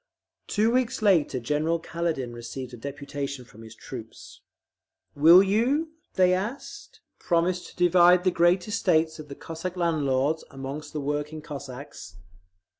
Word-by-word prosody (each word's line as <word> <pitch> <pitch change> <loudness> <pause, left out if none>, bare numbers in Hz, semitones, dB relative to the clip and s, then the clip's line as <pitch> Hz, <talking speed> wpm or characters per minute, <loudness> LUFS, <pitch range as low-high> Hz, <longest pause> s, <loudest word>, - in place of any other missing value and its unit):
Two 220 +2 +2
weeks 255 -2 0
later 165 -10 +3
General 150 +7 0
Kaledin 165 -7 -3
received 120 +2 -7
a - - -5
deputation 140 +1 -6
from 115 -1 -16
his 110 0 -12
troops. 115 -2 -10 0.7
"Will 165 +6 +8
you," 250 +11 +1 0.2
they 185 -1 +4
asked, 240 - -5 0.2
"promise 175 +1 0
to - - -18
divide 180 0 +5
the 185 - +3
great 175 +2 +2
estates 165 -7 +1
of 155 - -9
the 140 - -8
Cossack 165 +5 -6
landlords 155 -3 0
among 135 +2 -6
the 150 - -4
working 150 +2 -3
Cossacks?" 140 - -9
160 Hz, 135 wpm, -26 LUFS, 140-180 Hz, 0.7 s, Will